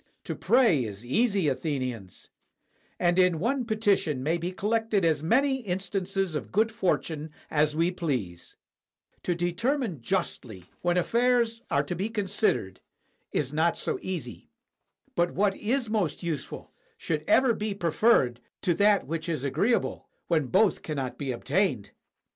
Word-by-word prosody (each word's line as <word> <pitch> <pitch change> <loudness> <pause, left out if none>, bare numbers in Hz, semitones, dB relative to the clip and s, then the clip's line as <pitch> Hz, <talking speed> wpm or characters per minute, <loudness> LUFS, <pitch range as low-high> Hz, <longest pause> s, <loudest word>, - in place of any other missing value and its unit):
To - - -4
pray 230 - +3
is 105 0 -7
easy, 200 - +2
Athenians; 130 - -3 0.7
and 175 +1 +2
in 180 -2 +4
one 245 - 0
petition 205 - +1
may 165 +4 +1
be 175 +2 -3
collected 215 0 0
as 155 -3 +2
many 265 - +2
instances 195 -3 -2
of 150 - -4
good 220 +3 +2
fortune 160 - -1 0.2
as 150 0 +2
we 165 +3 +2
please. 125 - -4 0.7
To 175 - -1
determine 180 - -1
justly, 115 - -3 0.2
when 175 0 +1
i86 - - +1
DANGER 180 - +3
FROM 235 - +2
MACEDONIA 250 0 +4
affairs 230 0 -8
are 140 - +2
to 160 +5 -4
be 195 +6 -2
considered, 200 - -1 0.5
is 140 -1 -1
not 160 +2 +2
so - - -2
easy. 160 -11 -5 0.7
But 175 0 +1
what 200 0 +2
is 240 +3 -1
most 210 -6 -1
useful 160 -5 -4 0.3
should 155 -2 -2
ever 260 -3 +5
be 210 -1 -3
preferred 165 - +3 0.2
to 175 - +3
that 205 +3 +3
which 165 +3 -4
is 155 -5 -2
agreeable, 160 - 0 0.2
when 155 -5 +1
both 195 - +3
cannot 135 -5 -4
be 140 -3 -2
obtained. 135 - 0
175 Hz, 155 wpm, -27 LUFS, 150-210 Hz, 0.7 s, ever